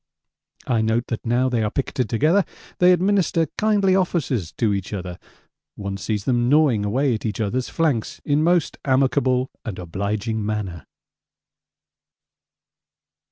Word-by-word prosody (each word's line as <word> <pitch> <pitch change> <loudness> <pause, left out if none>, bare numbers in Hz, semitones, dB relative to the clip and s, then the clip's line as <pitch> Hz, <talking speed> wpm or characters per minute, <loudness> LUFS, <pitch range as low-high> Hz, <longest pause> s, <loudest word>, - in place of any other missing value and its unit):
I 115 -3 +1
note 110 +2 +1
that 115 0 -4
now 125 +3 +2
they 120 -3 0
are 105 - 0
picketed 130 -2 -2
together 155 - +3 0.4
they 180 0 +6
administer 180 -2 +2
kindly 205 -3 +2
offices 155 - 0
to 110 -3 +1
each 100 +1 -4
other; 90 -3 -5 0.6
one 100 -1 -5
sees 105 0 -3
them 120 0 +1
gnawing 140 -8 +4
away 125 +6 +1
at 110 - -4
each 105 -2 -3
other's 120 +4 -1
flanks 150 -9 -1
in 145 +1 +2
most 170 0 +1
amicable 130 -1 +2
and 105 -5 -5
obliging 100 +5 -3
manner. 105 -5 -4
120 Hz, 135 wpm, -22 LUFS, 105-150 Hz, 0.6 s, they